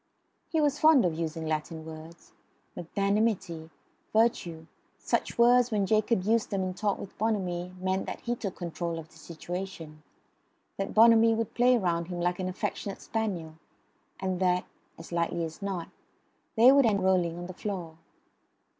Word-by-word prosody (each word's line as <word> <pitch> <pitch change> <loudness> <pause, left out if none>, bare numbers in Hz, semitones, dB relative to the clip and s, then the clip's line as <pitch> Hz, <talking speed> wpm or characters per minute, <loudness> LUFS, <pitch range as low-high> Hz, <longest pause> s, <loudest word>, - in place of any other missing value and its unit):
He 325 - 0
was 295 -1 +1
fond 310 -8 +6
of 170 - +1
using 160 0 -4
Latin 155 +1 -3
words. 160 +1 -11 0.4
Magnanimity, 195 -2 -1 0.4
virtue 180 -8 +1 0.3
such - - -2
words 245 +1 +5
when 210 -4 +1
Jacob 215 0 +2
used 220 +2 +1
them 195 -2 -1
in 185 0 -2
talk 205 +1 -1
with 195 - -9
Bonamy 185 -5 -1
meant 190 +1 -1
that - - -5
he 240 0 -2
took 200 -5 -5
control 170 -1 -4
of 160 -1 -8
the 160 - -18
situation; 170 -1 -7 0.8
that 195 0 -4
Bonamy 225 0 +6
would 225 -1 -3
play 250 +1 +4
round 170 -5 -1
him 175 -1 -5
like 175 +1 0
an 185 0 -2
affectionate 195 +1 -4
spaniel; 190 -8 -3 0.7
and 185 -1 -2
that 180 -1 +2 0.3
(as 165 - -11
likely 170 0 -1
as 160 +4 -9
not) 190 -4 -4 0.7
they 240 +3 +8
would 275 -3 +5
end 210 -2 +2
by 190 - -3
rolling 180 -3 +2
on 175 - -6
the 185 - -7
floor. 175 -5 -5
185 Hz, 165 wpm, -28 LUFS, 170-220 Hz, 0.8 s, they